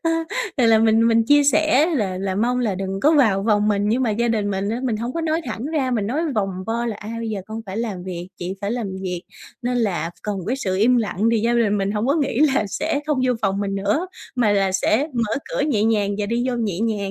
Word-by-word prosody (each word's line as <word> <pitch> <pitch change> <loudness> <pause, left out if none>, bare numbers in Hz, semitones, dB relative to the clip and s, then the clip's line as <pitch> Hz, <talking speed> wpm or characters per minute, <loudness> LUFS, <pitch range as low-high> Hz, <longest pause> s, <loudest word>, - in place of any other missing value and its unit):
ơ, 330 - +1 0.5
thì 245 -3 +3
là 225 -1 +6
mình 225 +1 +4
mình 225 0 +3
chia 290 +3 +5
sẻ 305 +1 +4
là 190 -8 -1
là 190 -1 -2
mong 245 +5 +1
là 220 -6 0
đừng 195 +1 -4
có 300 +7 +4
vào 220 -10 +3
vòng 210 -1 +2
mình 205 0 +1
nhưng 245 +4 +1
mà 230 - +1
gia 235 +3 0
đình 210 -3 0
mình 195 +1 -2
á 235 +3 -2
mình 230 -4 0
hông 235 +3 -4
có 335 - -2
nói 320 +1 0
thẳng 235 +1 -4
ra, 290 -4 -1
mình 215 -5 0
nói 280 +8 -1
vòng 195 -3 -2
vo 235 +1 -1
là 220 -3 -3
"A, 215 +2 -8
bây 225 -1 -3
giờ 200 -2 -3
con 220 +1 -6
phải 190 +2 -6
làm 210 -6 -3
việc, 180 -1 -6
chị 180 +2 -4
phải 200 +1 -2
làm 235 -3 -2 0.2
việc 180 -1 -4 0.4
nên 245 0 -1
là 175 -7 -1
cần 205 -2 -3
cái 255 +4 0
sự 190 -7 -2
im 240 +5 +4
lặng." 220 -1 0
Thì 230 - +2
gia 235 +2 +1
đình 210 -3 +2
mình 195 0 0
hông 210 +3 -1
có 280 - +3
nghĩ 275 -3 0
là 215 - +2
sẽ 285 +7 -2
không 300 -4 0
vô 250 - +3
phòng 195 0 0
mình 195 -1 -2
nữa 205 - 0 0.3
mà 220 -4 +3
là 195 -2 +2
sẽ 225 +9 +1
mở 230 -3 0 0.2
cửa - - -1
nhẹ 220 -8 +1
nhàng 210 -3 +2
và 205 - -1
đi 235 +3 -1
vô 250 - 0
nhẹ 210 -5 -2
nhàng. 210 -4 -1
220 Hz, 270 wpm, -21 LUFS, 200-245 Hz, 0.5 s, là